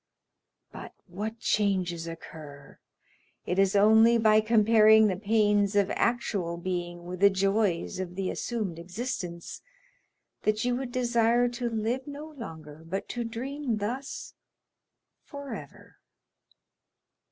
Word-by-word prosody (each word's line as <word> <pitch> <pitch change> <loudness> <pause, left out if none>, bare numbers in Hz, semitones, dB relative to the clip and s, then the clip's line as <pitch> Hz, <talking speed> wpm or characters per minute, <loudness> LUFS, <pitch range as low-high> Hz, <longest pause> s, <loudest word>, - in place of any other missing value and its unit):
But - - -10
what 210 +5 -5
changes 185 -6 0
occur! 155 -3 -10 0.7
It 180 - -1
is 195 0 +3
only 220 +3 +6
by 215 -1 +5
comparing 220 0 +5
the 195 -3 +1
pains 205 0 +2
of 200 -1 +2
actual 200 -8 -1
being 175 -1 -4
with 180 0 -6
the 200 +1 +7
joys 195 -2 0
of 180 -1 -5
the 195 -1 -2
assumed 210 -8 -3
existence, 180 -2 -5 0.8
that 215 +2 0
you 245 0 +1
would 255 -1 -4
desire 240 -1 +2
to 240 0 -3
live 230 +4 -2
no 295 +2 -8
longer, 160 - -10
but 185 +4 -4
to 240 - -3
dream 245 +2 -3
thus 245 +7 -5 0.9
forever. 265 - -9
210 Hz, 120 wpm, -28 LUFS, 180-235 Hz, 0.9 s, the